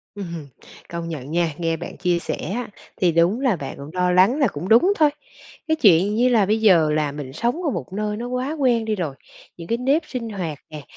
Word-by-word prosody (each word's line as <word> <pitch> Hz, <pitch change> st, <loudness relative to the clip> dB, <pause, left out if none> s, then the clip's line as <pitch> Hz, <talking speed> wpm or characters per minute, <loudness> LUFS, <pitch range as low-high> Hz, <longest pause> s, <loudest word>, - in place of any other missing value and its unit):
Ừm 200 Hz, -2 st, -5 dB
hừm. 150 Hz, -4 st, -8 dB, 0.4 s
Công 170 Hz, 0 st, -5 dB
nhận 145 Hz, -4 st, -6 dB
nha, 170 Hz, -2 st, 0 dB
nghe 165 Hz, -1 st, 0 dB
bạn 170 Hz, +1 st, -8 dB
chia 175 Hz, -1 st, +1 dB
sẻ -, -, -4 dB, 0.2 s
á, 245 Hz, +1 st, -3 dB, 0.3 s
thì 175 Hz, -3 st, +2 dB
đúng 170 Hz, +8 st, +2 dB
là 255 Hz, -9 st, +2 dB
bạn 140 Hz, -3 st, -7 dB
cũng 140 Hz, +2 st, -9 dB
lo 180 Hz, 0 st, +1 dB
lắng 195 Hz, +10 st, +4 dB
là 275 Hz, -6 st, +3 dB
cũng 165 Hz, +3 st, -6 dB
đúng 245 Hz, -, +5 dB
thôi. 300 Hz, -2 st, +5 dB, 0.6 s
Cái 315 Hz, -, +2 dB
chuyện 200 Hz, -, +4 dB
như 245 Hz, +3 st, +3 dB
là 220 Hz, -6 st, +3 dB
bây 220 Hz, +2 st, +1 dB
giờ 170 Hz, -8 st, +5 dB
là 150 Hz, -2 st, 0 dB
mình 145 Hz, -3 st, -7 dB
sống 240 Hz, -, -1 dB
ở 305 Hz, -, 0 dB
một 195 Hz, -, -5 dB
nơi 210 Hz, +1 st, -2 dB
nó 240 Hz, +2 st, -5 dB
quá 255 Hz, +4 st, -2 dB
quen 240 Hz, -5 st, +2 dB
đi 220 Hz, -, -1 dB
rồi, 160 Hz, -7 st, -3 dB, 0.4 s
những 170 Hz, -1 st, -10 dB
cái 230 Hz, -, 0 dB
nếp 275 Hz, +6 st, +2 dB
sinh 240 Hz, -3 st, -5 dB
hoạt 170 Hz, -8 st, -4 dB
nè, 150 Hz, -1 st, -8 dB
195 Hz, 240 wpm, -22 LUFS, 165-240 Hz, 0.6 s, đúng